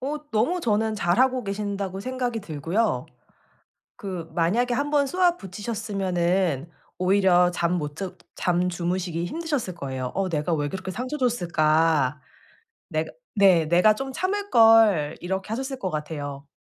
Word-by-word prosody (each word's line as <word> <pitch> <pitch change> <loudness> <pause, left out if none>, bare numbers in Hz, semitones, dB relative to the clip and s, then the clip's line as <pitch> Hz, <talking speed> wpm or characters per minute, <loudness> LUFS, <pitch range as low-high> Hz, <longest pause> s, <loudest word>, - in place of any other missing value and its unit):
어 285 +4 -3
너무 275 +12 +1
저는 220 -3 +1
잘하고 250 +7 +2
계신다고 200 -1 -3
생각이 245 0 -3
들고요. 175 +5 -1 0.9
그 180 -5 -6
만약에 225 +9 +1
한번 285 +2 +1
쏘아붙이셨으면은 195 - -1 0.3
오히려 185 -1 +4
잠 170 0 0
못 150 -1 -5
자 190 0 -4 0.2
잠 180 0 +1
주무시기 175 -1 -2
힘드셨을 290 - -3
거예요. 130 -5 -4
어 195 -1 0
'내가 160 0 -1
왜 145 -2 -1
그렇게 190 0 -5
상처 255 +8 -4
줬을까? 160 - +2 0.7
내가' - - -2 0.3
네, 185 -6 +5
'내가 180 +6 +5
좀 270 +3 -5
참을걸.' 225 - +4
이렇게 190 +3 -3
하셨을 265 +4 -3
것 190 -6 -3
같아요. 145 -2 -5
190 Hz, 295 characters per minute, -25 LUFS, 170-235 Hz, 0.9 s, 네